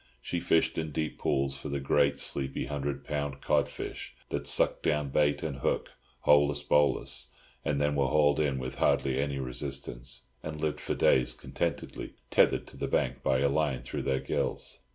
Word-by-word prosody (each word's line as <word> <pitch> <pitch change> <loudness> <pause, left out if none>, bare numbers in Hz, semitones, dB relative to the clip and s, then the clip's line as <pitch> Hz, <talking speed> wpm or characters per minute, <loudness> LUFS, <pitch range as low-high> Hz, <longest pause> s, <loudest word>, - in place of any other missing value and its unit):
She 85 +8 -3
fished 80 -1 +2
in 80 -1 -2
deep 80 +1 -3
pools 70 0 +1
for 75 - -7
the 70 0 -1
great, 70 +1 +2
sleepy, 65 -1 -1
hundred 70 0 -3
pound 70 -2 -3
cod - - +2
fish - - -7
that - - -3
sucked - - +2
down 75 0 +1
bait 75 +1 +2
and 70 -4 -3
hook, 70 - -1 0.3
holus 70 0 +4
bolus, 70 -4 +2 0.4
and 70 - 0
then 75 0 +2
were 70 -2 +2
hauled 75 +2 +3
in 70 -3 +1
with 65 0 -5
hardly 65 -1 +2
any 70 0 -1
resistance, 65 -2 -2 0.2
and 75 0 -6
lived 75 -1 -1
for - - -2
days 65 -2 +3
contentedly, - - -4 0.2
tethered - - +4
to - - -14
the - - -2
bank - - 0
by 65 0 +2
a 70 - +4
line 70 -2 0
through - - -4
their 65 -1 0
gills. 65 - -2
70 Hz, 180 wpm, -30 LUFS, 65-75 Hz, 0.4 s, holus